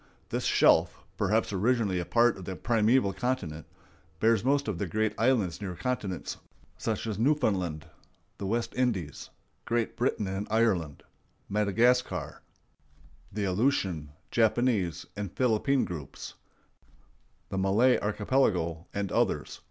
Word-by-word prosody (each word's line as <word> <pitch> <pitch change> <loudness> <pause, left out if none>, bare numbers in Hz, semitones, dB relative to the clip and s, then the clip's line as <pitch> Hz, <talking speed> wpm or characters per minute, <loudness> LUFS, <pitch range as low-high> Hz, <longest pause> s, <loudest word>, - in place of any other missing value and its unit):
This - - -2
shelf, - - +3
perhaps 105 +1 +1
originally 105 -2 +1
a 90 - -3
part 120 0 +3
of 95 - -9
the 95 - -4
primeval 110 +2 +2
continent, 90 -12 -3 0.5
bears 115 -1 +3
most 140 +1 +2
of 100 -6 -2
the 100 - -1
great 110 +3 0
islands 110 -7 +1
near 95 -3 -4
continents, 105 -6 -3 0.4
such 110 -1 -3
as 110 -3 -3
Newfoundland, 100 - +1 0.5
the 100 - -3
West 115 +3 -1
Indies, 105 - -1 0.3
Great 115 -1 -1
Britain 120 -3 0
and 95 +2 -3
Ireland, 100 -10 +1 0.4
Madagascar, 115 +5 +1 0.9
the 105 0 -3
Aleutian, 95 - 0 0.2
Japanese, 110 - +1
and 105 -3 -4
Philippine 130 +2 +2
groups, 80 -6 -7 1.2
the 95 - -2
Malay 105 +7 +4
Archipelago, 100 -7 0
and 100 -2 -2
others. - - 0
105 Hz, 120 wpm, -29 LUFS, 95-120 Hz, 1.2 s, Malay